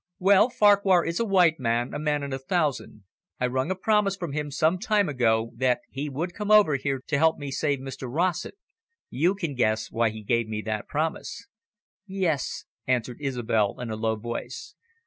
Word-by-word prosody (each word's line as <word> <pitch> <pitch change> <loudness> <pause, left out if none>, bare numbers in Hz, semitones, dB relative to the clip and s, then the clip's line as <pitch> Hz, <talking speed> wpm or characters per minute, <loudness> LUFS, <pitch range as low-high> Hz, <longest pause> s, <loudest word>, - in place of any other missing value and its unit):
"Well, 200 +4 +5
Farquhar 200 -5 +4
is 165 0 -2
a 230 - +1
white 180 -6 +3
man, 120 0 -1
a - - -3
man 150 -1 0
in 140 -1 -4
a 135 - -3
thousand. 145 - -2 0.4
I 125 - +1
wrung 130 +4 -1
a 190 - 0
promise 205 0 +1
from 175 -5 -5
him 150 +1 -3
some 160 +5 +1
time 205 0 +1
ago 115 -5 +1
that 125 +1 +1
he 145 +2 -4
would 165 +6 -4
come 210 +1 -5
over 210 -8 +6
here 135 -1 -2
to 145 - 0
help 160 +1 +3
me 145 -1 -6
to - - -3
save 145 -2 0
Mr 130 -1 -7
Rossett. 175 - -1 0.6
You 170 +9 +1
can 170 -7 -3
guess 110 -3 0
why 115 0 +1
he 110 0 -9
gave 115 +1 0
me 105 -1 -4
that 110 -1 -3
promise." 160 +8 -3 0.6
"Yes," 175 -7 -2 0.2
answered 125 +1 -1
Isobel 120 -6 0
in 120 -2 -5
a - - -2
low 110 0 -1
voice. 120 - -6
140 Hz, 195 wpm, -26 LUFS, 120-180 Hz, 0.6 s, over